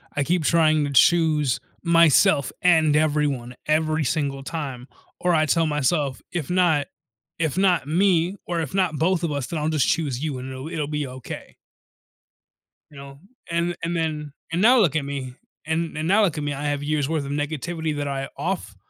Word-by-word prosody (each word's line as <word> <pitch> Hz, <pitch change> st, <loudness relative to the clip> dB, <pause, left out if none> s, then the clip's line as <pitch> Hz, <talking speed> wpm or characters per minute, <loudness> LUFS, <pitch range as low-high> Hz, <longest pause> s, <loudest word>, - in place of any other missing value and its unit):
I 145 Hz, -, +1 dB
keep 170 Hz, +1 st, 0 dB
trying 155 Hz, -2 st, +3 dB
to 145 Hz, -, -3 dB
choose 150 Hz, -1 st, +3 dB, 0.2 s
myself, 165 Hz, -4 st, +4 dB
and 160 Hz, -4 st, +4 dB
everyone, 145 Hz, -5 st, 0 dB
every 155 Hz, +1 st, +1 dB
single 140 Hz, 0 st, -2 dB
time, 135 Hz, -6 st, -5 dB, 0.3 s
or 180 Hz, -1 st, +1 dB
I 155 Hz, 0 st, +3 dB
tell 165 Hz, +1 st, +2 dB
myself, 150 Hz, -2 st, 0 dB
if 170 Hz, -4 st, -4 dB
not 175 Hz, -5 st, +2 dB, 0.5 s
if 160 Hz, -1 st, -1 dB
not 180 Hz, -7 st, +2 dB
me, 180 Hz, +2 st, +2 dB
or 170 Hz, -1 st, -1 dB
if 155 Hz, -, -5 dB
not 180 Hz, -6 st, +1 dB
both 175 Hz, +2 st, +1 dB
of 160 Hz, -, 0 dB
us, 140 Hz, -3 st, -3 dB
then 165 Hz, -, -3 dB
I'll 150 Hz, +1 st, -1 dB
just 155 Hz, -5 st, +1 dB
choose 145 Hz, -4 st, -1 dB
you, 145 Hz, -4 st, -2 dB
and 130 Hz, +1 st, -7 dB
it'll 130 Hz, +4 st, -7 dB
it'll 150 Hz, -4 st, -3 dB
be 150 Hz, -1 st, -2 dB
okay. 130 Hz, 0 st, -9 dB, 1.4 s
You 145 Hz, -, -14 dB
know? 140 Hz, 0 st, -11 dB, 0.3 s
And 170 Hz, +1 st, -1 dB
and 170 Hz, +1 st, -1 dB
then 155 Hz, -3 st, -2 dB, 0.2 s
and 170 Hz, +3 st, 0 dB
now 245 Hz, +4 st, +6 dB
look 165 Hz, -7 st, +3 dB
at 145 Hz, -3 st, 0 dB
me, 135 Hz, -3 st, -5 dB, 0.3 s
and 160 Hz, 0 st, -2 dB
and 155 Hz, +1 st, -2 dB
now 210 Hz, +3 st, +4 dB
look 170 Hz, -5 st, 0 dB
at 150 Hz, -, -3 dB
me. 145 Hz, -, -2 dB
I 145 Hz, +1 st, -5 dB
have 145 Hz, -1 st, -1 dB
years 150 Hz, -1 st, -1 dB
worth 155 Hz, -3 st, -1 dB
of 140 Hz, -, -5 dB
negativity 155 Hz, +2 st, -3 dB
that 145 Hz, 0 st, -2 dB
I 135 Hz, -1 st, -3 dB
off 180 Hz, -, -3 dB
155 Hz, 195 wpm, -23 LUFS, 140-170 Hz, 1.4 s, now